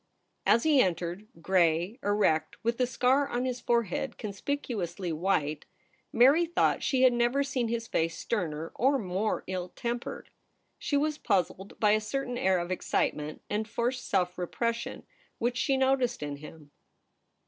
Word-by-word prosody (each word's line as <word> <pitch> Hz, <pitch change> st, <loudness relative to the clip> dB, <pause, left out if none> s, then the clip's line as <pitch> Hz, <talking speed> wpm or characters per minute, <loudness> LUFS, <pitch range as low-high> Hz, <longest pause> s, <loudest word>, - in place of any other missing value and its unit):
As 230 Hz, -, +5 dB
he 300 Hz, -4 st, +5 dB
entered 180 Hz, +2 st, -1 dB
— 165 Hz, -, -18 dB
gray, 180 Hz, -, +2 dB
erect, 205 Hz, -6 st, +1 dB
with 235 Hz, +2 st, 0 dB
the 250 Hz, -, +3 dB
scar 260 Hz, +3 st, +2 dB
on 245 Hz, +1 st, -1 dB
his 250 Hz, -1 st, -2 dB
forehead 235 Hz, +2 st, 0 dB
conspicuously 200 Hz, -, -3 dB
white 155 Hz, -3 st, 0 dB, 0.3 s
— 260 Hz, 0 st, -36 dB
Mary 285 Hz, +8 st, +5 dB
thought 345 Hz, -, +2 dB
she 260 Hz, -2 st, +2 dB
had 255 Hz, -1 st, +6 dB
never 240 Hz, +4 st, +2 dB
seen 270 Hz, -4 st, -1 dB
his 230 Hz, 0 st, -2 dB
face 165 Hz, -3 st, -1 dB
sterner 165 Hz, -7 st, -3 dB
or 275 Hz, +3 st, +2 dB
more 200 Hz, 0 st, -1 dB
ill 180 Hz, -1 st, -4 dB
tempered. 235 Hz, +5 st, -5 dB, 0.5 s
She 285 Hz, -, 0 dB
was 300 Hz, +1 st, 0 dB
puzzled 195 Hz, -2 st, -1 dB
by 210 Hz, -1 st, +4 dB
a 215 Hz, +1 st, +3 dB
certain 245 Hz, +2 st, -3 dB
air 190 Hz, 0 st, +3 dB
of 175 Hz, +1 st, -3 dB
excitement 150 Hz, -4 st, -1 dB
and 215 Hz, +1 st, -2 dB
forced 240 Hz, +3 st, -1 dB
self 180 Hz, 0 st, 0 dB
repression 230 Hz, +6 st, -3 dB, 0.3 s
which 240 Hz, +1 st, -1 dB
she 270 Hz, 0 st, +2 dB
noticed 260 Hz, -, +1 dB
in 145 Hz, -1 st, -4 dB
him. 150 Hz, 0 st, -12 dB
220 Hz, 160 wpm, -29 LUFS, 180-255 Hz, 0.5 s, had